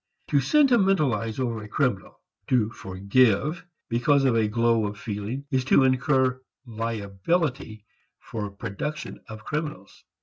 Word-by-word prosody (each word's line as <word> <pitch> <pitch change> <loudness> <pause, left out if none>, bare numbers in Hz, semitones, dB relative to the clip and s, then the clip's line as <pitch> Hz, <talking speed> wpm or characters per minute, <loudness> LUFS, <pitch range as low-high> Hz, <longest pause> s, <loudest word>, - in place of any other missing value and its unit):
To 145 - +3
sentimentalize 190 - +2
over 115 -4 -2
a 105 - -9
criminal 115 -4 -1 0.3
to 115 -4 +2
"forgive" 110 - +1 0.2
because 135 +4 +2
of 125 -3 +3
a 110 -2 +2
glow 115 0 +2
of 105 0 -7
feeling 110 +4 -5
is 130 -2 +1
to 135 - +5
incur 130 0 +2 0.2
liability 115 - -2 0.3
for 105 -2 -6
production 115 +9 -5
of 110 0 -10
criminals. 150 - -5
120 Hz, 125 wpm, -25 LUFS, 105-140 Hz, 0.3 s, to